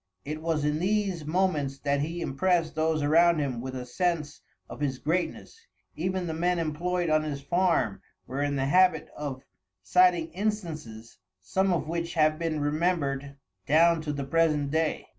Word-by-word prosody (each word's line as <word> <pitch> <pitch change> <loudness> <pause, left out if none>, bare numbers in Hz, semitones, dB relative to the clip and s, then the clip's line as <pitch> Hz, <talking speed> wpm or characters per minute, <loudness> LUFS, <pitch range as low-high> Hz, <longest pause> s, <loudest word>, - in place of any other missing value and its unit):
It 155 +2 -5
was 160 -2 0
in 150 +1 0
these 190 -3 0
moments 155 -5 0
that 140 0 0
he 165 +4 -3
impressed 170 +3 +1
those 155 -1 0
around 165 +3 +5
him 135 -5 -2
with 130 +1 -6
a 125 -1 -5
sense 160 +1 -2 0.3
of - - -9
his 140 -3 -1
greatness. 180 - -3 0.3
Even 185 +2 -2
the 165 - -3
men 175 +2 +1
employed 170 +2 -1
on 155 0 +4
his 145 -2 -4
farm 165 - +1 0.2
were 135 +2 -4
in 145 0 0
the 135 -1 0
habit 180 +1 +3
of 140 -3 -5 0.4
citing 175 - +3
instances, 160 - -4 0.2
some 190 - 0
of 170 -3 -1
which 170 +1 -3
have 155 -1 +3
been 165 -2 -1
remembered 145 -3 -1 0.3
down 165 +2 +4
to 155 -1 -3
the 140 -1 -3
present 150 -2 +1
day." 160 0 0
155 Hz, 165 wpm, -27 LUFS, 145-175 Hz, 0.4 s, around